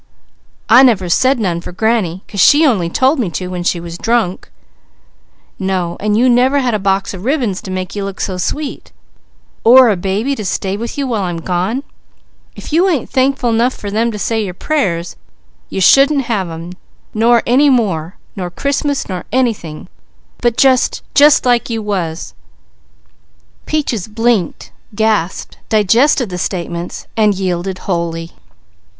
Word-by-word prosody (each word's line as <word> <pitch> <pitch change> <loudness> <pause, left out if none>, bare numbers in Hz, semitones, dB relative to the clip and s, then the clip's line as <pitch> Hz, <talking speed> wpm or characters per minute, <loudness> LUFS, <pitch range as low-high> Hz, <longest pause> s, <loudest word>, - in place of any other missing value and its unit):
"I 245 +3 +7
never 210 -9 +3
said 260 +9 +3
none 180 -7 -2
for - - -8
granny, 195 -3 -1
'cause 200 - -7
she 295 - +6
only 195 - +1
told 265 - +2
me 215 -7 0
to 180 -1 -5
when 180 -1 -4
she 175 0 0
was 170 +1 -8
drunk." 225 -6 -1 1.1
"No 185 -3 -2
and 210 0 0
you 250 +3 +3
never 255 +3 +3
had 255 -4 0
a 215 - 0
box 195 0 0
of 185 -1 -8
ribbons 240 -7 -1
to - - -9
make 185 0 -4
you 200 - -3
look 195 -1 -6
so 185 -2 -3
sweet, 290 +10 -4 0.7
or 250 +1 +7
a 210 - +2
baby 195 +9 -1
to 220 - -5
stay 190 0 -2
with 230 +5 -6
you 280 - -1
while 230 -5 -1
I'm 175 -3 -3
gone. 185 +10 -2 0.7
If - - -9
you 355 +4 +3
ain't 300 -10 -2
thankful 260 -2 +1
enough 235 +3 +1
for 205 - -7
them 230 +3 0
to 210 - -6
say 220 +1 -1
your 180 -3 -6
prayers, 185 - -2 0.5
you - - -4
shouldn't 275 - +5
have 210 -6 -1
them, 165 +1 -8 0.4
nor 230 +1 +3
any 270 +5 +4
more, 190 - 0 0.2
nor 180 -3 -4
Christmas, 280 - -2
nor 180 -3 -5
anything, 220 -12 -2 0.5
but 240 -1 +1
just 260 -2 +2
just 290 -1 +5
like 245 0 +2
you 225 -2 -3
was." 170 - -3 1.3
Peaches 265 -11 -2
blinked, 225 -4 -1 0.2
gasped, 210 -5 -1
digested 230 +4 +3
the 180 -1 -5
statements, 175 -1 -4
then 215 -2 +3
yielded 185 -1 -3
wholly. 170 -2 -3
210 Hz, 160 wpm, -15 LUFS, 180-250 Hz, 1.3 s, I